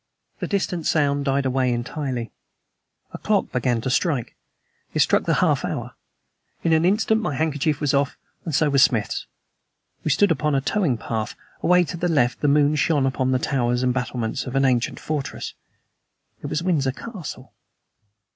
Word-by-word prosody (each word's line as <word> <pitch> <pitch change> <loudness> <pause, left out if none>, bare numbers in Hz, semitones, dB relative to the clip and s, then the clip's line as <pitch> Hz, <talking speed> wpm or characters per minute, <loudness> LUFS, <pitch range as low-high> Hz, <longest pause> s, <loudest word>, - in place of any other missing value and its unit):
The - - -3
distant 185 -5 -1
sound 145 -2 +1
died 140 0 +1
away 130 -1 +1
entirely. 120 0 -3 0.8
A - - -6
clock - - 0
began 120 -2 0
to 130 - -2
strike; 140 -4 0 0.6
it - - +1
struck - - +3
the - - +2
half - - +2
hour. - - -4 0.7
In 165 - +3
an 160 +1 +3
instant 220 +3 +2
my 155 -9 -2
handkerchief 150 0 0
was 145 -2 0
off, 140 0 +1 0.3
and 160 -5 -2
so 150 +1 +3
was 140 -1 +4
Smith's. 115 -6 +2 0.8
We - - -1
stood 200 +8 +4
upon 150 -2 +1
a - - +3
towing 150 - +1
path. 110 0 -4 0.3
Away 180 0 +4
to 175 +1 -5
the 175 - 0
left 125 -6 +2
the 145 - +2
moon 145 +1 +4
shone 145 -3 +2
upon 130 -1 0
the 130 - +3
towers 125 -2 0
and 125 -1 +2
battlements 125 0 -2
of 125 - -5
an 135 0 +3
ancient 125 -2 +1
fortress. 150 -3 -4 0.9
It - - -5
was 160 - -2
Windsor 145 -8 +1
Castle. 170 - -8
140 Hz, 175 wpm, -23 LUFS, 130-160 Hz, 0.9 s, was